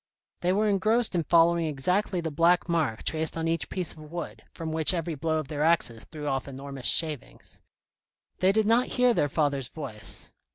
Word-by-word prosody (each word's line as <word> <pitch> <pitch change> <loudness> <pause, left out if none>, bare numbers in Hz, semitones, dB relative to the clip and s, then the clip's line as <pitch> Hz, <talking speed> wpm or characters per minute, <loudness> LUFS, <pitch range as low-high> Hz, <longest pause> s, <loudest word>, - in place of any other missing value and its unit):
They 180 - 0
were 210 +3 +1
engrossed 215 +3 +1
in 170 -3 -1
following 170 +1 +3
exactly 180 +6 -1
the 160 -1 -4
black 170 +4 +2
mark 155 -10 -1
traced 160 +1 0
on 165 0 -2
each 165 0 -2
piece 180 -3 -1
of - - -16
wood, 160 +3 -8
from 160 -1 -6
which 160 +3 +4
every 165 -1 -3
blow 160 +2 -2
of 155 -3 -4
their 150 0 -5
axes 155 -8 +2
threw 150 -2 -9
off 135 -2 -2
enormous 135 -1 -4
shavings. 155 -5 +1 0.8
They 185 +1 +4
did 215 +1 +1
not 230 +3 +3
hear 250 -1 +4
their 145 - 0
father's 140 -4 0
voice. 125 -8 -3
165 Hz, 190 wpm, -27 LUFS, 145-180 Hz, 0.8 s, which